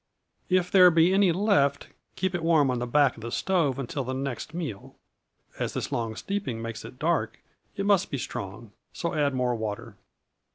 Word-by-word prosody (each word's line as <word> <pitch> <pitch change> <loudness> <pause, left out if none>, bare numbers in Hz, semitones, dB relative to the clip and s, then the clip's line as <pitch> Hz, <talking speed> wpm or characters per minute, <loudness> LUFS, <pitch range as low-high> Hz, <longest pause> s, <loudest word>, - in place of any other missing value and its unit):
If 185 -1 +2
there 185 -2 +8
be 170 +2 +4
any 195 -2 +4
left, 145 -7 +1 0.3
keep 190 0 -1
it 175 - -2
warm 160 -5 +3
on 125 - -1
the 125 - -3
back 140 +1 +3
of - - -11
the 115 +1 -6
stove 145 0 +1
until 140 +1 -3
the 130 +1 -4
next 135 +1 -4
meal. 160 - -6 0.6
As - - -2
this - - -3
long 115 -2 -2
steeping 195 - -3
makes 115 -1 -6
it 125 - -11
dark, 140 -8 0 0.4
it 200 -1 -2
must 200 -2 +3
be 140 - -3
strong, 100 -1 -6 0.2
so, 170 - -3
add 145 -3 +1
more 125 -1 +1
water. 110 -1 -5
140 Hz, 190 wpm, -27 LUFS, 120-175 Hz, 0.6 s, there